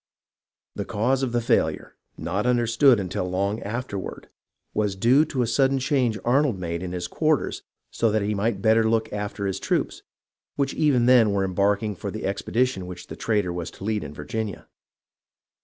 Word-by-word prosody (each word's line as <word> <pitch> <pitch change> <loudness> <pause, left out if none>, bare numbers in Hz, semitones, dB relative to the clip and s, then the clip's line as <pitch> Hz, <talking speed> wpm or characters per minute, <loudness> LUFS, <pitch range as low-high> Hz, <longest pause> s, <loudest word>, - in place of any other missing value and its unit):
The - - -3
cause 125 +6 0
of 130 -2 -1
the 120 0 +1
failure, 115 - 0 0.2
not 100 +7 -2
understood 120 +1 +4
until 90 -1 -3
long 100 +4 -1
afterward, 105 -3 -5 0.4
was 105 -2 0
due 125 +10 +4
to 135 -5 -1
a - - +1
sudden 135 +4 +2
change 130 -4 +1
Arnold 130 -2 +2
made 85 -2 -4
in 90 -1 -4
his 90 -1 -3
quarters 155 - 0 0.3
so 115 - +1
that 110 -1 +1
he 105 +1 0
might 100 0 -1
better 110 0 +4
look 110 -1 0
after 105 -1 -3
his 95 -1 -2
troops, - - -1 0.5
which 140 -1 0
even 140 -6 +2
then 120 -5 +5
were 100 -1 +1
embarking 100 +3 0
for 100 +3 -5
the 110 +2 -5
expedition 100 0 -1
which 90 -1 -9
the - - -6
traitor 105 -6 0
was 85 -1 -4
to - - -13
lead 105 0 -1
in - - -7
Virginia. 95 +8 -5
110 Hz, 175 wpm, -24 LUFS, 95-120 Hz, 0.5 s, then